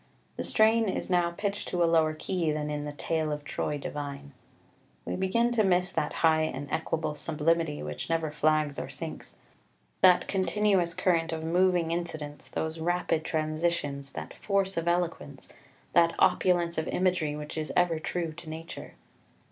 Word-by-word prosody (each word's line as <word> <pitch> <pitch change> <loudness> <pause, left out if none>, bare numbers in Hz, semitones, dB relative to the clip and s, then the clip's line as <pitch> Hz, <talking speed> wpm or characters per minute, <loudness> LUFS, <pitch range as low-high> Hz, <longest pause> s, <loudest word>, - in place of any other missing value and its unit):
The - - -3
strain 220 0 +4
is 190 - -3
now 175 -1 +3
pitched 200 +3 -3
to 175 -1 +1
a - - +5
lower 160 -2 +3
key 170 0 -1
than 150 0 -2
in 150 0 -3
the 150 - -4
"Tale 155 +1 -1
of 150 0 -4
Troy 150 0 -2
divine": 140 0 -6 0.7
we - - -2
begin 230 +6 +1
to 230 -2 +3
miss 180 -1 +2
that 150 - -1
high 160 -1 +5
and 145 -2 -3
equable 160 -1 -1
sublimity 160 - 0
which 75 - -5
never 165 -2 0
flags 155 -1 +1
or - - -5
sinks, - - -7 0.7
that 180 -1 +6
continuous 195 -2 +1
current 165 -2 +1
of 160 -1 -3
moving 175 0 +2
incidents, 160 -4 -4
those 160 +1 -3
rapid 170 -1 0
transitions, 155 -3 -2
that - - -6
force 195 -1 0
of 165 0 -2
eloquence, 170 -5 -2 0.4
that 170 -1 +4
opulence 175 -2 +3
of 160 - -3
imagery 180 -5 +1
which 150 0 -7
is 155 -1 -3
ever 175 -3 +3
true 165 0 -2
to 165 0 -10
Nature. 160 +1 -8
165 Hz, 165 wpm, -29 LUFS, 155-180 Hz, 0.7 s, that